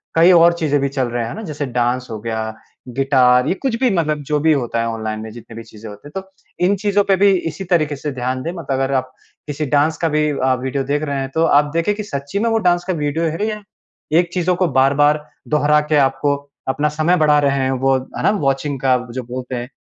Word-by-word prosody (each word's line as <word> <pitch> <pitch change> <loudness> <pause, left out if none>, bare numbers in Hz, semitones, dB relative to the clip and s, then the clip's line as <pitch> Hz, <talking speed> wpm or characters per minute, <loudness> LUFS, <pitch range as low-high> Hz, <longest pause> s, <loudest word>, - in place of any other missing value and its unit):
कई 170 +3 +6
और 170 0 +6
चीज़ें 155 -4 0
भी 140 - 0
चल 130 -2 -1
रहे 120 0 -2
हैं। 115 - -4
है - - -6
ना? 220 - -6
जैसे 150 -5 -4
डांस 125 0 -1
हो 110 - -5
गया, 110 0 -3 0.6
गिटार, 130 -2 +4
ये - - +2
कुछ 250 +4 -2
भी 255 -1 +3
मतलब 155 -3 0
जो 150 -1 +1
भी 160 +2 +3
होता 120 -4 -1
है 115 - -1
ऑनलाइन 110 -1 -4
में, 110 0 -7
जितने 115 0 -12
भी 115 - -7
चीज़ें 110 -1 -12
होती 105 +6 -12
हैं। 170 +6 -6
तो 190 0 -23 0.3
इन 195 +3 +3
चीज़ों 205 0 +3
पे 195 - +3
भी 200 +1 +5 0.2
इसी 155 +5 -7
तरीक़े 155 -3 +1
से 145 +2 -4
ध्यान 130 0 -3
दें। 165 - -3
मतलब 170 -6 -7
अगर 135 +1 0
आप 130 0 -1 0.4
किसी 150 +1 -3
डांस 150 +2 +2
का 165 - 0
भी 150 0 +1
अ, 130 -2 +1
वीडियो 130 +1 -2
देख 145 +3 -1
रहे 140 -2 -2
हैं, 135 0 -3
तो 160 - +3
आप 145 -1 +3
देखें 165 +5 +1
कि 210 - -5
सच्ची 140 -1 -4
में 230 +2 +1
वो 225 - +2
डांस 175 0 +1
का 185 - 0
वीडियो 150 +1 -1
है 165 +6 -1
या 210 -1 -4 0.6
एक 175 -1 0
चीज़ों 180 0 +1
को 185 0 +1
बार-बार 145 +3 +3 0.2
दोहरा 150 0 +3
के - - +4
आपको 135 +2 0 0.3
अपना 150 +3 +1
समय 170 +3 +3
बढ़ा 150 -2 +4
रहे 140 -1 +1
हैं 130 0 0
वो, 135 0 +2 0.2
है - - -3
ना? - - +4
वॉचिंग 140 -6 -1
का 130 -1 +3
जो 130 +1 -5
बोलते 125 +1 -6
हैं 120 0 -5
145 Hz, 250 wpm, -19 LUFS, 130-165 Hz, 0.6 s, कई